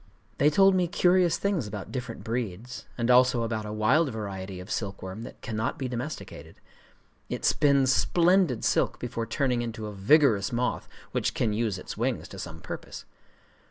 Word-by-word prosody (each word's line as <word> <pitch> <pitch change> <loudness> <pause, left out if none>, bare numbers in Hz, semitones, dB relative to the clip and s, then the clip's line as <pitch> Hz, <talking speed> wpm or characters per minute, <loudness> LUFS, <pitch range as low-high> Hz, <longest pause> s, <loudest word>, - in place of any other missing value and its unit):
They 145 - +5
told 195 +5 +5
me 180 -2 +2
curious 175 0 +3
things 195 - -1
about 100 -1 -7
different 125 -3 -5
breeds, 115 0 -4
and 120 0 +2
also 125 -1 +5
about 110 -2 -3
a - - -5
wild 125 +9 +3
variety 95 -4 -6
of 90 - -9
silkworm 95 0 -4
that 115 - -9
cannot 110 0 -2
be 130 - -3
domesticated:—it 125 +5 -8
spins 140 -2 +4
splendid 175 - +3
silk - - +1
before 115 -2 -4
turning 125 -4 0
into 115 -2 -5
a 105 - -6
vigorous 105 0 +4
moth 125 +1 -1 0.2
which - - -1
can 110 -3 +1
use 110 -3 -1
its 90 - -8
wings 120 +2 -1
to 95 - -9
some 80 -2 -7
purpose. - - -8
120 Hz, 160 wpm, -27 LUFS, 105-140 Hz, 0.2 s, They